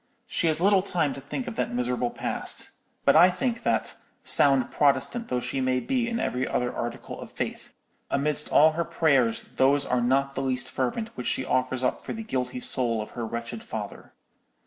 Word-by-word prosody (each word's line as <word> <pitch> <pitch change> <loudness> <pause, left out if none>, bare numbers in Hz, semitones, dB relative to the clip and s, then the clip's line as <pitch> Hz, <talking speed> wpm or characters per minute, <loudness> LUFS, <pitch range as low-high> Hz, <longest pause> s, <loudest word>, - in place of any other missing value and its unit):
She 170 - -1
has 155 -1 +1
little 195 +1 +4
time 170 -7 0
to 135 - -8
think 190 - -5
of 240 - -6
that - - -1
miserable 125 0 0
past; - - -3 0.3
but - - +5
I 175 +3 +8
think 235 +6 -2
that, - - 0 0.3
sound 135 -3 +4
Protestant 145 - +1
though 125 - -1
she 135 +2 -2
may 130 0 +1
be 240 - -1
in 230 0 -2
every 130 - -1
other 125 0 -1
article 120 0 -5
of - - -8
faith, - - -5 0.4
amidst 150 +1 +1
all 155 +2 +6
her 165 +2 -1
prayers 140 -9 +2
those 140 +2 +3
are 125 -1 +1
not 135 +3 +1
the 135 - -3
least 130 -1 -1
fervent 135 - -2
which 125 - -4
she 130 - 0
offers 130 0 0
up - - 0
for - - -5
the 225 - -6
guilty 125 - -3
soul 120 -2 0
of 105 - -6
her 120 -2 -4
wretched 115 0 -5
father. 105 -2 -7
135 Hz, 195 wpm, -26 LUFS, 125-165 Hz, 0.4 s, I